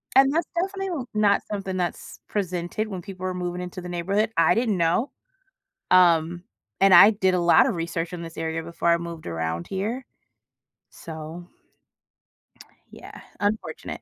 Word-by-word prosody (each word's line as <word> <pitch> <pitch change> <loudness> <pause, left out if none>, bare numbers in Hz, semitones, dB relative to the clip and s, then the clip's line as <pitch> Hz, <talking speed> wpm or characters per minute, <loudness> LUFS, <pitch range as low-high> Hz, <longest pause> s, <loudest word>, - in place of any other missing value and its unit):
And 270 +1 +6
that's 330 0 0
definitely 380 -5 -2
not 210 -1 +3
something 195 -2 -3
that's 175 -2 -4
presented 185 +2 -2
when 190 -4 -6
people 185 -1 -8
are 185 - -1
moving 180 0 -4
into 180 0 -7
the 180 - -8
neighborhood. 195 +6 0
I 165 +4 +4
didn't 225 -5 +1
know, 170 - +1 0.8
um, 175 -1 +4 0.4
and 195 -1 +5
I 175 +5 +10
did 190 -3 +1
a 180 - +2
lot 175 +7 +5
of 225 - -1
research 165 +1 -3
in 170 - -5
this 165 -1 -9
area 165 0 -2
before 170 +1 -2
I 170 - +5
moved 170 -2 -8
around 80 0 -3
here, 220 +7 -3 0.8
so 160 +2 -9 1.4
yeah, - - -12 0.2
unfortunate. 205 +2 -3
180 Hz, 155 wpm, -24 LUFS, 170-210 Hz, 1.4 s, I